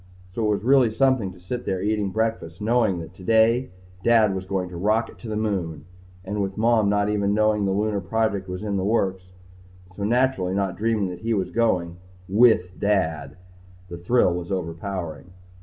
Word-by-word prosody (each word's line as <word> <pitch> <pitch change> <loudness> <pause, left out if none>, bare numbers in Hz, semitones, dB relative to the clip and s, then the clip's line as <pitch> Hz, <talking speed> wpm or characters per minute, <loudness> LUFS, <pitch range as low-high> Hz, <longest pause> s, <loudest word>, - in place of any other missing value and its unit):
So 115 - -2
it - - +2
was 105 0 0
really 130 -1 +5
something 125 -4 +1
to 90 - -15
sit 120 +8 -5
there 95 - -2
eating 105 0 0
breakfast 110 -5 -2
knowing 110 -3 +1
that, 80 +1 -10
today, 115 +6 +2 0.3
Dad 110 -4 +4
was 95 0 -5
going 95 -2 -2
to 90 - -10
rocket 110 +6 0
to 120 - -9
the 110 - -3
Moon. 90 -8 -2 0.4
And 100 +2 -2
with 95 -1 -3
Mom 110 -2 +3
not 105 0 +1
even 100 -1 0
knowing 110 -1 +2
the 95 - 0
Lunar 105 +1 0
project 100 0 -1
was 90 +2 -5
in 100 -2 -1
the 95 - -1
works, 95 -3 0 0.7
so 100 - -5
naturally 115 -5 +1
not 95 -2 -1
dreaming 110 -3 0
that 90 -1 -7
he 115 +3 -1
was 95 -3 -2
going 90 -7 0 0.3
with 100 -3 +3
Dad! 80 -8 -1 0.5
The 85 - -7
thrill 90 0 +2
was 90 +2 -5
overpowering. 90 -1 -5
100 Hz, 185 wpm, -24 LUFS, 90-110 Hz, 0.7 s, really